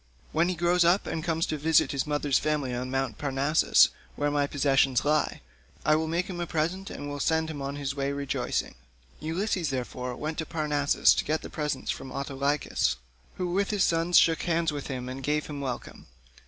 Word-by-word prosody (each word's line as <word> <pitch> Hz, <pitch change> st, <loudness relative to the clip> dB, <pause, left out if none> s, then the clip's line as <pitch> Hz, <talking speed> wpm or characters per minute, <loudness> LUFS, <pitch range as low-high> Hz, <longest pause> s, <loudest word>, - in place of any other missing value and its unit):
When 165 Hz, +3 st, +2 dB
he 185 Hz, -, -1 dB
grows 175 Hz, +1 st, +3 dB
up 175 Hz, +4 st, +3 dB
and 160 Hz, -1 st, -3 dB
comes 165 Hz, -1 st, 0 dB
to 155 Hz, -, -3 dB
visit 160 Hz, +2 st, +3 dB
his 140 Hz, +1 st, -1 dB
mother's 145 Hz, -2 st, +1 dB
family 150 Hz, -4 st, -1 dB
on 125 Hz, +1 st, -3 dB
Mt. 135 Hz, -4 st, -2 dB
Parnassus, 140 Hz, +2 st, +4 dB, 0.3 s
where 145 Hz, 0 st, 0 dB
my 145 Hz, -1 st, +1 dB
possessions 135 Hz, -3 st, +2 dB
lie, 150 Hz, 0 st, +1 dB, 0.4 s
I 155 Hz, -, +5 dB
will 160 Hz, +1 st, 0 dB
make 170 Hz, +3 st, 0 dB
him 185 Hz, -3 st, -6 dB
a 175 Hz, -, -2 dB
present 170 Hz, +5 st, -1 dB
and 145 Hz, -, -6 dB
will 145 Hz, 0 st, -5 dB
send 160 Hz, +2 st, +1 dB
him 145 Hz, -3 st, -6 dB
on 140 Hz, +1 st, -3 dB
his 140 Hz, -1 st, -3 dB
way 140 Hz, 0 st, -1 dB
rejoicing." 140 Hz, -1 st, -2 dB, 0.5 s
Ulysses, 170 Hz, +1 st, -1 dB
therefore, 125 Hz, -1 st, -4 dB
went 155 Hz, +4 st, -4 dB
to 160 Hz, -, -2 dB
Parnassus 150 Hz, -3 st, +3 dB
to -, -, 0 dB
get 155 Hz, +1 st, -1 dB
the -, -, -8 dB
presents 150 Hz, -3 st, -2 dB
from 130 Hz, -, -7 dB
Autolycus, 140 Hz, -, 0 dB, 0.4 s
who 180 Hz, -1 st, -2 dB
with 195 Hz, +2 st, +1 dB
his 205 Hz, -3 st, +2 dB
sons 165 Hz, +1 st, +3 dB
shook 165 Hz, -1 st, +5 dB
hands 170 Hz, -2 st, +1 dB
with 145 Hz, -2 st, -5 dB
him 125 Hz, -2 st, -4 dB
and 130 Hz, +1 st, -6 dB
gave 150 Hz, +2 st, 0 dB
him 145 Hz, -2 st, -6 dB
welcome. 130 Hz, -3 st, -6 dB
150 Hz, 200 wpm, -28 LUFS, 140-165 Hz, 0.5 s, I